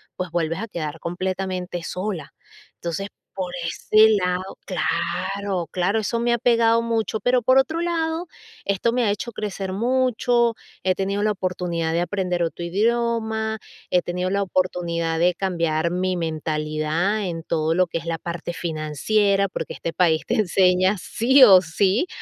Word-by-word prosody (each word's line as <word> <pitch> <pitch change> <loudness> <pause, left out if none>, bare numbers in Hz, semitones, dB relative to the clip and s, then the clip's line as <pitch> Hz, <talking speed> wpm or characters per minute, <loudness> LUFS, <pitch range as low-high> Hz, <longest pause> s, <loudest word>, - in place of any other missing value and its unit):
pues, 180 -2 -4
vuelves 165 0 -1
a 225 - -4
quedar 160 -4 -5
completamente 180 0 -3
sola. 180 -3 -4 0.4
Entonces, 175 +4 -4 0.3
por 180 -2 -4
ese 215 +5 +4
lado 180 +1 -2
Claro. 185 +1 -2
Claro, 185 +5 +1
eso 230 +3 -1
me 240 0 +2
ha - - +2
pegado 230 -1 +4
mucho. 225 -1 -1
Pero, 250 0 +3
por 260 +3 +4
otro 315 +5 +2
lado, 330 0 -1 0.4
esto 200 +4 +1
me 245 0 +1
ha 205 - +2
hecho 210 +4 -4
crecer 195 -3 -4
mucho. 240 0 +2 0.3
He 185 - +3
tenido 200 +2 -1
la 215 - +2
oportunidad 180 -4 -2
de 170 - +1
aprender 180 -1 -1
otro 170 +1 -3
idioma. 220 +2 0 0.3
He 180 - +4
tenido 180 +1 -2
la 200 +1 0
oportunidad 170 -3 -1
de 175 +1 +3
cambiar 170 -4 0
mi 185 +1 0
mentalidad, 155 +4 -1
en 165 -3 -4
todo 160 -1 0
lo 185 0 +3
que 165 - -3
es 165 - -12
la 165 -1 -2
parte 170 +1 -5
financiera. 175 +6 +1
Porque, - - -5
este 165 - -5
país, 165 -3 +2
te - - 0
enseña, 185 -1 +3
sí, 260 +9 +3
o 190 -4 +8
sí. 190 - +1
185 Hz, 160 wpm, -23 LUFS, 170-220 Hz, 0.4 s, o